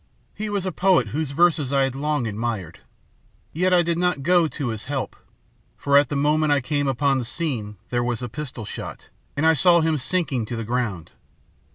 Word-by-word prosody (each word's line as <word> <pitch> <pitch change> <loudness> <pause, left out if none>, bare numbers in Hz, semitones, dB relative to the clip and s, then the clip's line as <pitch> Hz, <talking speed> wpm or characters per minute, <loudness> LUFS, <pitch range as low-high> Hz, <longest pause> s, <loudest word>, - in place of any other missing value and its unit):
He 215 0 -4
was 200 -2 -2
a 185 - -1
poet 180 - +3
whose 150 +5 -2
verses 155 -2 +2
I 140 -1 +3
had 135 -1 -1
long 145 -1 -1
admired. 105 -5 -4 0.7
Yet 180 +3 +1
I 180 -1 +5
did 170 0 -1
not 180 -6 0
go 175 +1 +4
to 145 -4 -4
his 110 -2 -5
help, 135 -2 -3 0.6
for 140 0 +1
at 140 -2 +5
the - - -2
moment 150 +2 +2
I 145 - +4
came 145 +2 -1
upon 135 +1 +1
the - - -2
scene 120 -6 -4
there 120 -1 +1
was 120 0 -2
a - - -2
pistol 125 -3 -7
shot, - - -8 0.3
and 150 - +1
I 160 - +6
saw 170 +3 +5
him 160 -2 +1
sinking 130 -6 -1
to 120 - -4
the 115 - -3
ground. 110 -8 -2
140 Hz, 205 wpm, -23 LUFS, 120-160 Hz, 0.7 s, I